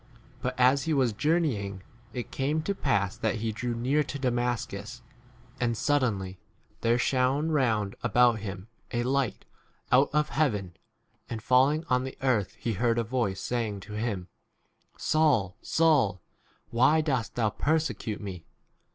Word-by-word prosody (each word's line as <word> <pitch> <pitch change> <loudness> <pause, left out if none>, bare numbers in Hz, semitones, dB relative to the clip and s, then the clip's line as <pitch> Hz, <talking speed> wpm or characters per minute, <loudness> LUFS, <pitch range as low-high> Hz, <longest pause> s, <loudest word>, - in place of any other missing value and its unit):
But 125 0 -3
as 130 +3 +4
he 160 -2 +1
was 130 -5 +2
journeying, 110 - 0 0.3
it 125 -2 -6
came 150 +4 -1
to 200 - -1
pass 100 - 0
that - - -1
he 110 0 -2
drew 120 +2 -3
near 130 +6 +1
to 140 - -5
Damas 125 -2 0
cus, 110 +5 -8 0.6
and 115 -2 0
suddenly 105 -10 0 0.4
there 115 +1 +3
shone 130 +5 +1
a - - -1
round 110 -9 +1
about 120 -2 +4
him 100 -1 -6 0.2
a 120 0 0
light 135 -1 -1 0.5
out 130 +3 +5
of 150 +1 +2
b 150 - -13
4 - - -7
heaven, 105 - +1 0.6
and 115 - -4
falling 135 +6 +3
on 125 -2 +2
the 130 - -6
earth 115 -8 +1
he 115 - -2
heard 115 +3 +1
a 115 - +2
voice 115 -5 -1
saying 110 -4 -2
to 105 - -10
him, 105 -4 -3 0.7
Saul, 130 - +2
Saul, 145 - +3 0.5
why 130 +7 +4
dost 130 -7 -1
thou 110 -3 +1
perse 160 +6 +1
5 - - -7
cute 110 -2 -4
me 95 -5 -6
120 Hz, 165 wpm, -28 LUFS, 105-140 Hz, 0.7 s, out